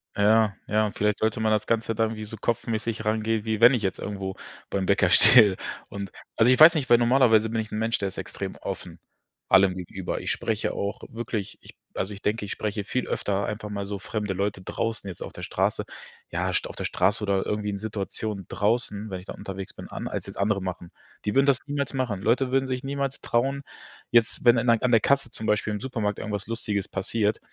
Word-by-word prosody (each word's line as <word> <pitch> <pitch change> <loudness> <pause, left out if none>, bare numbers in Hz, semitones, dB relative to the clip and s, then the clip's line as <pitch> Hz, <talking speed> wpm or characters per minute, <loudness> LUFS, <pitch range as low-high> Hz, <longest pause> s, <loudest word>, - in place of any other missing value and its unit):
Ja, 105 0 +4
ja, 105 0 +1
vielleicht 105 0 +1
sollte 110 0 0
man 110 0 +1
das 110 0 +1
Ganze 115 0 0
dann 110 +1 +1
irgendwie 110 -1 -6
so 110 +1 -7
kopfmäßig 115 -1 -2
rangehen, 110 0 0
wie 110 -1 -1
wenn 120 +3 +9
ich 120 -4 0
jetzt 95 - -1
irgendwo 95 -2 -4 0.3
beim 95 -1 -1
Bäcker 100 -2 +3
stehe 105 -2 +7 0.3
und 100 -1 -5 0.3
also, 115 +3 +5
ich 130 - +3
weiß 160 +2 +10
nicht, 145 -4 -1
weil 120 - +8
normalerweise 120 -2 +4
bin 115 0 0
ich 110 - -8
'n - - -3
Mensch, 115 +1 +1
der 100 - -1
ist 95 - -8
extrem - - -5
offen - - -6 0.5
allem 95 -1 +5
gegenüber. 90 0 -4
Ich - - -4
spreche - - -1
auch 100 +1 -3
wirklich, 115 -3 -5
ich - - -16 0.2
also, 95 +2 -2
ich 100 - -10
denke, 105 +1 -1
ich 100 - -7
spreche 105 -1 -3
viel 125 +5 -2
öfter 100 0 -1
einfach 105 0 -5
mal 100 -1 -4
so 100 - -3
fremde 105 0 -3
Leute 100 0 -1
draußen 110 +3 -3
jetzt 95 - -6
auf - - -7
der - - -9
Straße, - - 0 0.5
ja, 90 +2 -1
St - - 0
auf - - -9
der - - -5
Straße 105 +2 +1
oder 100 -2 +1
irgendwie 105 0 -2
in 100 - -3
Situationen 105 -1 -4
draußen, 105 -1 -1
wenn 95 -2 -4
ich - - -16
dann - - -8
unterwegs 95 0 -7
bin - - -9
an, - - -5
als - - -4
jetzt - - -9
andere 100 0 +1
machen. 90 -2 -6 0.3
Die 105 - 0
würden 135 +1 +4
das 140 -3 +4
niemals 145 -1 -2
machen. 120 -7 -1
Leute 125 +4 +2
würden 135 0 +2
sich 130 -1 -3
niemals 140 0 -2
trauen. 135 +4 0 0.5
Jetzt, 120 +1 +3
wenn 120 0 +7
dann 120 +1 +1
an 115 +2 +3
der 115 - +6
Kasse 135 +1 +1
zum 110 - -5
Beispiel 105 0 +1
im 105 - -3
Supermarkt 110 -5 -2
irgendwas 105 -2 -4
Lustiges 105 -3 -2
passiert, 105 +2 -1
110 Hz, 220 wpm, -26 LUFS, 100-115 Hz, 0.5 s, weiß